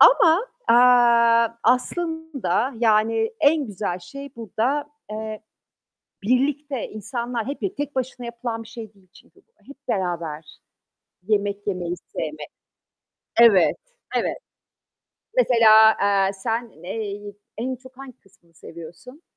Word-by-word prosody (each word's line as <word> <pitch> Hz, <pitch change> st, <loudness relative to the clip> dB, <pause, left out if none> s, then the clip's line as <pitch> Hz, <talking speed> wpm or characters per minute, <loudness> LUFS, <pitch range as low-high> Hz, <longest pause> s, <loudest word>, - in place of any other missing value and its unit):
Ama, 360 Hz, 0 st, +6 dB, 0.2 s
aaa, 235 Hz, -1 st, +5 dB
aslında 290 Hz, -, 0 dB
yani 225 Hz, 0 st, +2 dB
en 290 Hz, -1 st, +3 dB
güzel 195 Hz, -3 st, -4 dB
şey 275 Hz, +9 st, -10 dB
burada, 235 Hz, +6 st, -1 dB, 0.3 s
eee, 215 Hz, 0 st, -5 dB, 0.8 s
birlikte 270 Hz, +2 st, 0 dB
insanlar, 235 Hz, +2 st, -4 dB
hep 280 Hz, -, -5 dB
bir 390 Hz, 0 st, -3 dB
tek 290 Hz, -1 st, -4 dB
başına 255 Hz, -1 st, -3 dB
yapılan 235 Hz, -1 st, -5 dB
bir 225 Hz, -, -15 dB
şey 225 Hz, -3 st, -9 dB
değil 190 Hz, -2 st, -26 dB
çünkü -, -, -30 dB
bu, 460 Hz, -, -44 dB, 0.2 s
hep 280 Hz, 0 st, -15 dB
beraber 165 Hz, -5 st, -3 dB, 0.7 s
yemek 205 Hz, -1 st, -1 dB
yemeyi 180 Hz, -3 st, -2 dB
sevmek. 155 Hz, -3 st, -7 dB, 0.9 s
Evet, 200 Hz, -8 st, +6 dB, 0.4 s
evet. -, -, 0 dB, 1.0 s
Mesela, 220 Hz, -, +6 dB
aaa, 200 Hz, -1 st, +2 dB
sen 225 Hz, +4 st, -3 dB
ey 205 Hz, +1 st, -6 dB, 0.2 s
en 255 Hz, +3 st, -2 dB
çok 260 Hz, 0 st, -17 dB
hangi 270 Hz, -2 st, -11 dB
kısmını 190 Hz, -4 st, -28 dB
seviyorsun? 175 Hz, -, -12 dB
230 Hz, 115 wpm, -23 LUFS, 200-260 Hz, 1.0 s, Ama